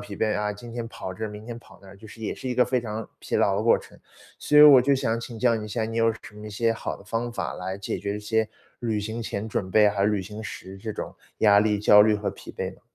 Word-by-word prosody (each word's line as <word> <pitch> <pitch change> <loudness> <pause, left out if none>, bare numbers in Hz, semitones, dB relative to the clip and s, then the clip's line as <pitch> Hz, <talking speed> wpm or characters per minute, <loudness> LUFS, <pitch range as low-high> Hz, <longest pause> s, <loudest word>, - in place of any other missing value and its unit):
疲 105 0 -8
惫 110 +1 +1
啊， 105 0 -1
今 115 +4 -11
天 120 -1 -4
跑 95 -3 -7
这 110 - -5
儿， - - -3
明 105 0 -9
天 120 -1 -6
跑 120 - -18
那 95 - -14
儿， 95 - -13
就 110 - -13
是 115 - -13
也 110 - -2
是 - - -9
一 125 - -1
个 125 - +4
非 125 +1 0
常 110 -1 -5
疲 - - -2
劳 - - +3
的 - - 0
过 - - +4
程。 - - -16 0.4
所 150 - +1
以 150 - +10
我 145 -4 +10
就 140 +3 +3
想 115 -3 0
请 115 -1 -8
教 120 0 +3
你 110 -1 -3
一 - - -9
下， 110 +1 -2
你 115 +1 -3
有 115 0 +4
什 - - -12 0.2
么 105 0 -10
一 - - -7
些 115 +2 +1
好 115 - -5
的 - - -16
方 115 +3 -2
法 - - -3
来 95 +1 -5
解 100 - -4
决 100 +1 -3
一 - - -5
些 110 +1 0 0.3
旅 115 -3 -1
行 110 +3 -4
前 105 -1 -4
准 95 -3 -3
备 105 +2 +5
和 100 -1 0
旅 105 -1 +1
行 105 +3 -8
时 95 -2 -8
这 110 +2 -5
种 - - -6 0.2
压 100 -2 +6
力、 105 -1 +1
焦 105 0 +7
虑 110 0 +4
和 105 0 -2
疲 - - -11
惫 - - -5
吗？ - - -24
110 Hz, 325 characters per minute, -25 LUFS, 105-115 Hz, 0.4 s, 以